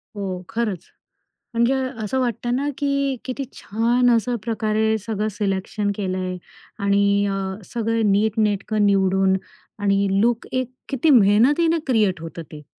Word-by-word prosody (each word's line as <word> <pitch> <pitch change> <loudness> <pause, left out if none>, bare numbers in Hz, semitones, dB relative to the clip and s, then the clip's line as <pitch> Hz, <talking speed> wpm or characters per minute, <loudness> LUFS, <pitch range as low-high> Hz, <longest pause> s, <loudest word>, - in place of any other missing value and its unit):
हो 190 -3 -4
खरंच. 220 -6 -2 0.7
म्हणजे 235 +3 +3 0.3
असं 260 +5 -1
वाटतं 240 0 -1
ना, 285 +2 -1
की 280 -1 0
किती 265 +1 -4
छान 240 +4 +1
असं 235 +1 +2
प्रकारे 220 -1 0
सगळं 215 0 -2
सिलेक्शन 205 +1 -2
केलंय 185 -2 -2 0.5
आणि 200 0 +3
अ, 200 - -1 0.4
सगळं 225 -2 +1
नीटनेटकं 210 0 +1
निवडून 190 -1 +3 0.5
आणि 200 0 +2
लूक 235 +1 +1
एक 255 -1 -1 0.2
किती 275 +4 +1
मेहनतीने 270 +9 +4
क्रिएट 210 -8 +2
होतं 165 0 -7
ते. 150 -1 -10
215 Hz, 125 wpm, -22 LUFS, 200-240 Hz, 0.7 s, मेहनतीने